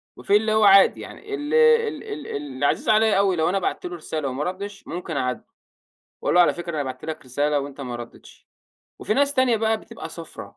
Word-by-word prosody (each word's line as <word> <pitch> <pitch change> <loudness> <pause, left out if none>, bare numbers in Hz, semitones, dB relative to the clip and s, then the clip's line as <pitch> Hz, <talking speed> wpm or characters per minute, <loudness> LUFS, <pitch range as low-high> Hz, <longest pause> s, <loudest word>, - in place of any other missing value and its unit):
وفيه 205 - +2
اللي 220 0 -1
هو 220 0 +3
عادي 195 -1 +6
يعني. 420 -1 -7
ال 295 -3 -5
ال 465 -1 +4
ال 420 -9 -7
اللي 140 -1 -4
عزيز - - 0
عليّا 220 -1 +4
أوي 195 -2 +3
لو 160 0 +1
أنا 195 +2 +1
بَعت 180 - -3
له 175 0 -5
رسالة 155 -3 -4
وما 135 +3 -3
رَدِّش، 200 +3 -6
ممكن 170 -3 -5
أعاتبه 125 -1 -2 0.8
وأقول - - 0
له: 180 - +8
"على - - +4
فكرة 170 -1 -6
أنا 145 - -1
بَعت 130 -1 -7
لك 155 -3 -6
رسالة 145 +3 0
وأنت 140 0 -7
ما 125 -3 -5
رَدّيتش." 120 0 -12 0.5
وفيه 215 - -1
ناس 285 +1 +2
تانية 260 -3 +3
بقى 220 0 +1
بتبقى - - -9
صفرا، - - -10
180 Hz, 215 wpm, -23 LUFS, 145-220 Hz, 0.8 s, له